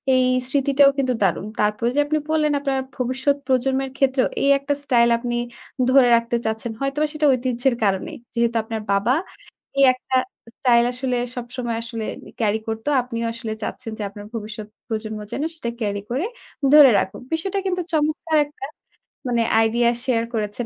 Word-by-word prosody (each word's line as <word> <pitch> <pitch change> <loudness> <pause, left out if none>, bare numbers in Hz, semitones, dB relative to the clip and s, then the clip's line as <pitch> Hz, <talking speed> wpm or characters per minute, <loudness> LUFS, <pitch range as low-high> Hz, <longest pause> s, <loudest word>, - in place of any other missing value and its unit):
এই 255 - +4 0.2
স্মৃতিটাও 280 +1 +4
কিন্তু 260 -2 +1
দারুণ। 190 0 +1
তারপরে 210 +3 +1
যে - - +3
আপনি 305 +1 0
বললেন 305 -1 +2
আপনার 275 -1 -1 0.2
ভবিষ্যৎ 260 +3 +1
প্রজন্মের 265 +1 +1
ক্ষেত্রেও 265 -1 +2 0.2
এই 280 - +3
একটা 280 +1 -1
স্টাইল 240 -4 +4
আপনি 240 0 -3 0.5
ধরে 260 -1 +6
রাখতে 235 +1 0
চাচ্ছেন। 220 +1 -2
হয়তোবা 275 +3 0
সেটা 305 0 0
ঐতিহ্যের 250 0 0
কারণেই। 195 -2 0 0.2
যেহেতু 235 0 +1
আপনার 220 0 -4
বাবা 200 +5 +2 0.7
এই 275 - +7
একটা 255 +1 -4 0.4
স্টাইল 240 -4 +4
আসলে 250 0 -1 0.2
সবসময় 240 -1 -4
আসলে 230 -1 -5 0.3
carry 220 -1 +1
করত। 225 0 -4 0.2
আপনিও 235 -2 -4
আসলে 230 -1 -5
চাচ্ছেন 230 +1 -5
যে - - -2
আপনার 205 +1 -10
ভবিষ্যৎ 215 -1 -6 0.2
প্রজন্ম 220 -1 -4
যেন 285 - -2
সেটা 240 -7 -4
carry 205 -2 -1
করে 270 +9 0 0.5
ধরে 295 -3 +10
রাখুক। 190 - -4
বিষয়টা 380 +5 -1
কিন্তু 365 -1 0
চমৎকার 310 +1 +1
একটা 290 -2 -9 0.6
মানে 240 -2 +2 0.2
idea 235 +1 +2 0.2
share 230 -3 +1
করেছেন 215 +1 -2
245 Hz, 160 wpm, -22 LUFS, 225-275 Hz, 0.7 s, ধরে